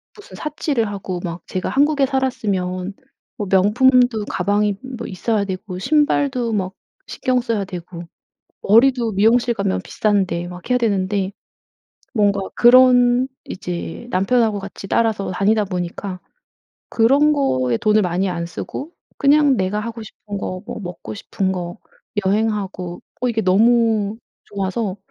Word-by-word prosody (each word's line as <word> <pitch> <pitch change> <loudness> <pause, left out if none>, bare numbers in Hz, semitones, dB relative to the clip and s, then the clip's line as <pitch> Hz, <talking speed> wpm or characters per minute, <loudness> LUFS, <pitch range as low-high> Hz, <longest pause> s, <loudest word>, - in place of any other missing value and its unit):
무슨 415 - -13
사치를 290 -6 -1
하고 190 -3 -5
막 170 -1 -5
제가 185 -1 -3
한국에 285 0 +3
살았으면 200 -8 -2 0.4
뭐 205 -5 -4
명품도 235 +3 +4
가방이 205 +2 0 0.2
뭐 230 - -6
있어야 205 +2 -1
되고 190 -1 -5
신발도 275 -3 +1
막 190 -2 -1 0.3
신경 255 -1 0
써야 225 -5 -1
되고 175 -1 -8 0.6
머리도 235 +2 +4
미용실 230 +4 +3
가면 95 - -1
비싼데 190 -5 0
막 180 +2 -10
해야 250 - +3
되는데 200 -3 0 0.8
뭔가 205 -4 +2
그런 250 +1 +6 0.2
이제 180 +4 -6
남편하고 215 +2 +2
같이 195 0 -8
따라서 220 -4 +1
다니다 210 +4 +2
보니까 185 0 -4 0.7
그런 275 +7 +4
거에 130 - +1
돈을 215 - +3
많이 180 +1 0
안 170 -1 -3
쓰고 275 - -6 0.3
그냥 285 -1 +4
내가 195 +1 -1
하고 230 +1 -6
싶은 205 -1 -8
거 185 -1 -4
뭐 - - -6
먹고 175 - -7
싶은 190 - -2
거 175 0 -5 0.5
여행하고 195 -3 -1 0.2
어 250 - +2
이게 225 -1 0
너무 220 +1 +3 0.3
좋아서 200 0 -3
205 Hz, 275 characters per minute, -20 LUFS, 185-240 Hz, 0.8 s, 그런